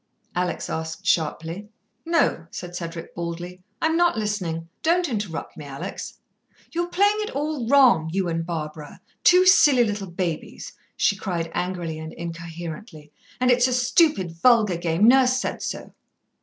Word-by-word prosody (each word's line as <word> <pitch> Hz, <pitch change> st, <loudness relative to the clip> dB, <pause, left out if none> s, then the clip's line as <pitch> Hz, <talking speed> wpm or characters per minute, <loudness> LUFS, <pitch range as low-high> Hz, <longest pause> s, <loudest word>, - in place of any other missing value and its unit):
Alex 180 Hz, -1 st, -2 dB
asked 160 Hz, 0 st, -5 dB
sharply. 165 Hz, +5 st, -1 dB, 0.4 s
"No," 330 Hz, -, +1 dB
said 175 Hz, 0 st, -8 dB
Cedric 165 Hz, -1 st, -6 dB
baldly. 175 Hz, +2 st, -6 dB, 0.2 s
"I'm 320 Hz, 0 st, +2 dB
not 345 Hz, -6 st, +3 dB
listening. 185 Hz, -7 st, -2 dB
Don't 345 Hz, +2 st, +2 dB
interrupt 210 Hz, -, -4 dB
me, 150 Hz, -, -9 dB
Alex." 140 Hz, +7 st, -7 dB, 0.5 s
"You're 345 Hz, +1 st, -1 dB
playing 405 Hz, +4 st, +2 dB
it 425 Hz, -, -2 dB
all 290 Hz, -4 st, -2 dB
wrong 240 Hz, -, +5 dB
you 190 Hz, 0 st, 0 dB
and 165 Hz, -1 st, -1 dB
Barbara. 155 Hz, -3 st, -6 dB, 0.2 s
Two 360 Hz, +1 st, +6 dB
silly 295 Hz, -9 st, +6 dB
little 205 Hz, -4 st, -3 dB
babies," 170 Hz, -2 st, -4 dB, 0.2 s
she 200 Hz, -, +3 dB
cried 170 Hz, -4 st, -3 dB
angrily 175 Hz, -3 st, -3 dB
and 160 Hz, 0 st, -7 dB
incoherently. 165 Hz, 0 st, -8 dB, 0.3 s
"And 250 Hz, 0 st, +3 dB
it's 245 Hz, +1 st, +4 dB
a 255 Hz, -, -1 dB
stupid, 245 Hz, -, +2 dB
vulgar 210 Hz, +1 st, +3 dB
game. 170 Hz, +4 st, +2 dB
Nurse 260 Hz, 0 st, +5 dB
said -, -, -3 dB
so." -, -, -5 dB
185 Hz, 145 wpm, -24 LUFS, 165-255 Hz, 0.5 s, Two